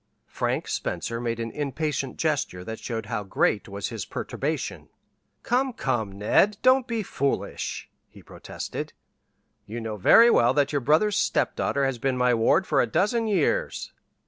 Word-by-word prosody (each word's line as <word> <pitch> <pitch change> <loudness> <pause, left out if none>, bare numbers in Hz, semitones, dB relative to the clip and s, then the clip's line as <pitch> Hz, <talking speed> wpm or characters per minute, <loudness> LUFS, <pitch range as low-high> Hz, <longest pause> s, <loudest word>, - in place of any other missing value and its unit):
Frank - - -2
Spencer 115 0 -3
made 115 -1 -2
an 115 0 -3
impatient 145 -1 -3
gesture 145 - -1
that 110 +3 -6
showed 115 -2 -4
how 110 0 -3
great 100 +1 0
was 100 -2 -4
his - - -5
perturbation. - - -4 0.5
"Come, 255 +1 +1
come, 120 - -1
Ned, 110 - +2
don't 255 0 +4
be 230 -2 -2
foolish," 140 -6 -3 0.2
he - - -16
protested. - - -7 0.7
"You 115 +3 -5
know 110 -2 -5
very 230 - +7
well 120 - +4
that 145 -1 +2
your 145 -2 0
brother's 160 - +3
stepdaughter 140 -8 0
has 135 -3 -2
been 130 +1 0
my 125 0 +3
ward 115 +11 +3
for - - +2
a - - +1
dozen 225 +3 +1
years." - - 0
135 Hz, 155 wpm, -25 LUFS, -, 0.7 s, very